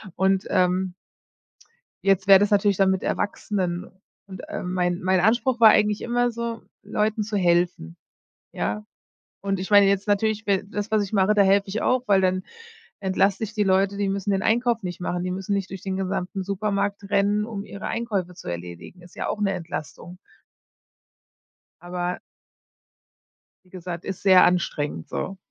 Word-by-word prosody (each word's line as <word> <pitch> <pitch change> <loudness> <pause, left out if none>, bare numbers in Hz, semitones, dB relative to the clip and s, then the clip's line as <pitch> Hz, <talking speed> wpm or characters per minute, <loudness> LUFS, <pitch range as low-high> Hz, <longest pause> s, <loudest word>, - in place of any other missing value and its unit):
und, 190 0 +1
ähm 185 0 +1 1.1
jetzt 195 0 +2
wäre 195 -1 +9
das 205 +1 +2
natürlich 205 -2 +3
dann 195 -1 +4
mit 190 -1 0
Erwachsenen 185 -4 -2 0.4
und, 190 -1 -9
ähm, 180 0 -4
mein 175 -1 0
mein 185 0 +2
Anspruch 240 +6 +2
war 225 -2 +9
eigentlich 210 0 +3
immer 245 0 0
so, 230 0 -4 0.2
Leuten 215 +1 -1
zu 210 0 -3
helfen, 175 - +1 0.6
ja. 105 +1 -3 0.6
Und 195 -1 -2
ich 190 - -5
meine, 205 -1 +7
jetzt 195 0 +1
natürlich 220 +1 +1
be 195 -3 +1
das, 205 +1 -5
was 215 -1 +2
ich 195 - -10
mache, 200 0 +3
da 205 - +5
helfe 195 +1 +3
ich 210 +3 -3
auch, 255 0 +2
weil 195 -2 +5
dann 185 0 +1 0.6
entlaste 195 +1 +1
ich 215 0 -8
die 210 - +1
Leute. 195 +1 +2
Die 200 -1 -1
müssen 195 +1 -2
den 190 -1 0
Einkauf 235 0 +1
nicht 180 -1 -6
machen, 175 0 -2
die 185 - -2
müssen 190 +2 -2
nicht 195 -1 -2
durch 190 -1 -8
den 190 -1 -3
gesamten 190 0 -3
Supermarkt 200 0 -2
rennen, 205 +1 +2
um 205 -3 -6
ihre 200 0 -8
Einkäufe 205 -6 -2
zu - - -10
erledigen. 85 - -8
Ist 175 - -17
ja - - -3
auch - - -2
'ne 200 -2 +1
Entlastung. 170 +1 -7 1.6
Aber 180 0 -4 1.5
wie - - -24
gesagt, 180 -1 -7
ist 190 -2 -6
sehr 190 -2 +7
anstrengend, 150 - 0
so. 195 - -4
195 Hz, 170 wpm, -24 LUFS, 180-205 Hz, 1.6 s, wäre